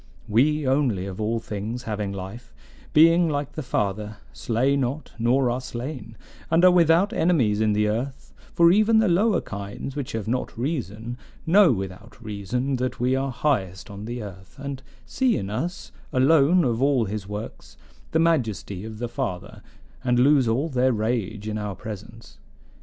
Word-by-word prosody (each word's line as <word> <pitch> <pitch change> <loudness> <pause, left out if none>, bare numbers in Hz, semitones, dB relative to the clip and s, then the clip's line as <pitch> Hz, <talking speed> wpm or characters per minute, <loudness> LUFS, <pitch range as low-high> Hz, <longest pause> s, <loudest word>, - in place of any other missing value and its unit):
"We 145 +6 +2
only, 130 -9 +1
of 95 +1 -6
all 110 +2 0
things 110 +3 -5
having 105 -3 -3
life, 100 +5 -8 0.4
being 165 +2 +5
like 145 -1 -2
the 155 - -5
Father, 105 -4 -2 0.2
slay 125 +5 +1
not 140 +2 -2
nor 125 +2 +2
are 125 +2 -2
slain, 120 -3 -7 0.3
and 165 +2 +4
are 185 - +8
without 175 +4 +4
enemies 130 - +2
in 110 -1 +3
the 105 0 +2
earth; 125 +6 -4 0.2
for 170 0 +5
even 215 +3 +4
the 220 -1 +4
lower 190 +3 +3
kinds, 100 +6 -7
which 140 -4 -4
have 110 -1 -3
not 125 0 -2
reason, 120 - -4 0.3
know 180 0 +6
without 95 +1 -5
reason 120 +5 -2
that 125 +1 -3
we 125 +2 +2
are 135 +1 -1
highest 100 -9 -1
on 100 +1 -8
the 120 0 -5
earth, 95 +1 -11
and 140 -1 -6 0.2
see 260 -3 +1
in 95 +1 -4
us, 175 - -4 0.2
alone 150 +6 +4
of 120 -2 0
all 135 -4 +3
his 100 -1 -5
works, 105 +2 -8 0.3
the - - 0
majesty 115 - 0
of 110 0 -7
the 120 +2 -3
Father, 115 -8 -5 0.4
and 125 -1 +2
lose 135 0 +4
all 125 +8 +1
their 130 -3 +2
rage 110 -2 -2
in 110 0 -2
our 105 -2 -4
presence. 110 +2 -10
125 Hz, 170 wpm, -24 LUFS, 105-145 Hz, 0.4 s, are